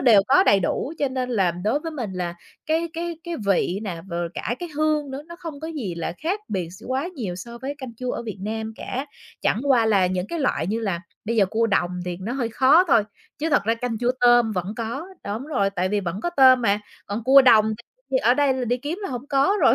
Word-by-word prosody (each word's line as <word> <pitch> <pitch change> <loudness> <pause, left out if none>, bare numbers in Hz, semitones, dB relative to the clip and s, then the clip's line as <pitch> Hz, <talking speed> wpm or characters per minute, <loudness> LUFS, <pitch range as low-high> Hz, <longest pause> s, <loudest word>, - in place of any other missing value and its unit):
đều 230 -6 +7
có 365 +8 +6
đầy 195 - +5
đủ 265 - -1
cho 280 - +1
nên 255 -1 -3
là 195 -6 +2
đối 210 - -1
với 325 - -5
mình 240 -11 -5
là 175 -2 -3 0.3
cái 325 +2 +1
cái 335 -1 -4
cái 345 - -4
vị 195 0 +1
nè, 180 -6 -4
rồi 170 -1 -2
cả 240 - -2
cái 350 - -5
hương 305 -2 +1
nữa, 270 +2 -6
nó 340 - -10
không 325 -5 -8
có 320 - -5
gì 245 - -4
là 170 0 -3
khác 370 +7 -2
biệt 180 -4 -2
s 190 +4 -13
quá 265 +6 -1
nhiều 210 - -4
so 235 +5 -8
với 270 +4 -4
canh 260 -4 -8
chua 250 0 -3
ở - - -4
Việt 215 -4 -6
Nam 220 +2 -4
cả. 265 +3 -4 0.3
Chẳng 225 - +1
qua 250 -5 +4
là 195 -4 +4
những 180 0 -2
cái 335 - -4
loại 260 - 0
như 220 +4 -1
là 195 -6 -2 0.2
bây 230 +2 -1
giờ 200 -3 +5
cua 225 +4 +1
đồng 175 -4 +1
thì 180 -1 -3
nó 220 +6 -4
hơi 250 -3 -1
khó 275 +9 +5
thôi, 265 -9 +5 0.4
chứ 320 +2 -1
thật 295 - +4
ra 225 +2 +2
canh 230 -1 -3
chua 245 +1 +1
tôm 240 -2 +5
vẫn 185 +3 -3
có. 235 +8 -4 0.2
Đúng 215 +7 -4
rồi, 200 -10 +1
tại 185 -1 -1
vì 205 +1 0
vẫn 185 +2 -4
có 345 - -1
tôm 260 -5 +6
mà, 205 -1 +2 0.3
còn 210 +3 -4
cua 270 +2 +8
đồng 220 -4 +6 0.4
thì 265 - +2
ở 245 0 +4
đây 285 -1 +3
là 260 -1 -2
đi 245 +1 +1
kiếm 290 +9 -4
là - - -3
hổng 250 +1 -5
có 280 +7 +3
rồi, 240 -4 +6
235 Hz, 260 wpm, -23 LUFS, 200-280 Hz, 0.4 s, cua